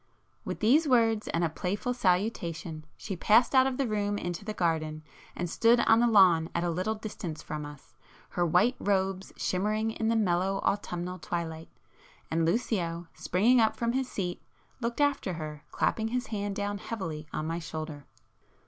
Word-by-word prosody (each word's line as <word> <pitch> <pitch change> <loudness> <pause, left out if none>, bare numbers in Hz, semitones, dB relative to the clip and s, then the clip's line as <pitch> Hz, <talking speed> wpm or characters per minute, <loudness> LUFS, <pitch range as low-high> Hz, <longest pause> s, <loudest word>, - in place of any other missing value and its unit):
With - - -5
these 285 +9 +4
words, 225 -4 +3
and 170 - 0
a - - +3
playful 200 +9 -2
salutation, 180 -7 -1
she 195 - -5
passed 225 +8 +4
out 260 0 +6
of 260 -1 -2
the 275 - +1
room 205 -1 -1
into 175 0 -4
the 215 - -4
garden, 155 -3 -1 0.3
and 175 - -2
stood 230 +7 +4
on 225 0 +5
the 240 - +4
lawn 180 -7 +5
at 170 - +1
a 175 - 0
little 185 +6 -1
distance 200 -7 -6
from 150 -1 -5
us, 145 -1 -13 0.4
her 175 - -1
white 180 +9 +3
robes 190 -1 0
shimmering 215 +4 0
in 220 0 -2
the 230 - +2
mellow 195 -2 +1
autumnal 180 -2 -2
twilight,—and 160 -2 -5
Lucio, 170 -4 -1
springing 230 +8 +3
up 220 - +3
from 235 0 0
his 260 0 -1
seat, 180 -3 -3 0.4
looked 235 +3 -2
after 285 -10 +1
her, 155 -2 -7
clapping 220 0 0
his 250 +2 -2
hand 205 -1 -2
down 205 0 -2
heavily 165 -10 -5
on 155 - -3
my 165 +1 -2
shoulder. 155 -3 -6
190 Hz, 170 wpm, -29 LUFS, 165-225 Hz, 0.4 s, out